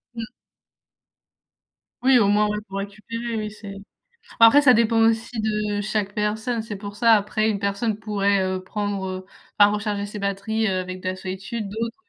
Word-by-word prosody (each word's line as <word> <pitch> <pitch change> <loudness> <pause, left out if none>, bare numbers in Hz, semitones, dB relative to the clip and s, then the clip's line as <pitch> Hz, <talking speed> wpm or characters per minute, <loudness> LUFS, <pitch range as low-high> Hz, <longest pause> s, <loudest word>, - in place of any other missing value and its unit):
Mmh. 230 - -4 1.8
Oui, 260 -1 +6
au 205 -4 +4
moins 210 +1 +3
ouais, 210 0 -2
pour 195 - -5
récupérer, 220 +4 -5
oui 215 -1 -3
c'est 205 -2 -9 0.7
après 230 +6 +8
ça 255 -3 +6
dépend 225 0 +3
aussi 225 +1 +1
de 210 -1 -1
chaque 205 -1 -2
personne, 220 +3 -1
c'est 220 -1 -6
pour 205 +1 -8
ça. 230 0 +5
Après 215 +1 +1
une 210 - 0
personne 200 +2 -1
pourrait, 200 -2 +1
heu, 185 0 -2
prendre, 205 0 -3
heu 185 0 -6 0.3
enfin 205 0 +6
recharger 205 -1 -2
ses 205 +1 -7
batteries, 200 +3 -1
heu, 185 -1 0
avec 185 0 -7
de - - -5
la 185 - -3
solitude, 195 +4 -5
d'autres 230 +3 -4
210 Hz, 180 wpm, -23 LUFS, 200-225 Hz, 1.8 s, après